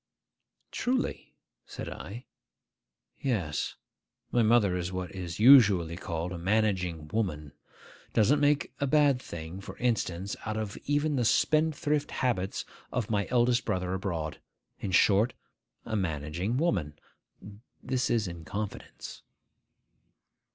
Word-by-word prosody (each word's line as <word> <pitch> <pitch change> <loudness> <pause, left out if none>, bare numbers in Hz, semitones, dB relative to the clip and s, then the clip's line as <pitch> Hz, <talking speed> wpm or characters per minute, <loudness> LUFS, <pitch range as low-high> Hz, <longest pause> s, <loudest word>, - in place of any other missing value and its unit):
'Truly?' 255 +1 -2 0.3
said - - -7
I. 120 +6 -8 0.9
'Yes: 90 - -1 0.6
my 120 - +3
mother 110 -4 +4
is 90 0 -2
what 90 -1 -4
is 90 -2 -6
usually 105 -10 +7
called 85 -1 -4
a 90 - -5
managing 90 -5 0
woman. 75 -9 -2 0.6
Doesn't 125 +7 +4
make 145 0 +2
a 140 - +1
bad 140 -2 +4
thing, 85 0 -7
for 95 0 -9
instance, 100 -6 -1
even - - -5
out 110 - -2
of 110 -2 -3
the 145 -2 +1
spendthrift 150 +3 +2
habits 105 -7 -1 0.3
of 120 -3 -2
my 100 -2 +1
eldest 120 0 +3
brother 90 0 -1
abroad. 85 -5 -3 0.4
In 100 - -3
short, 100 +5 +4 0.5
a 110 - -3
managing 85 - -1
woman. 90 - 0 0.9
This 130 0 0
is 110 -4 +1
in 85 -1 -7
confidence. 100 +4 -6
105 Hz, 120 wpm, -29 LUFS, 90-125 Hz, 0.9 s, usually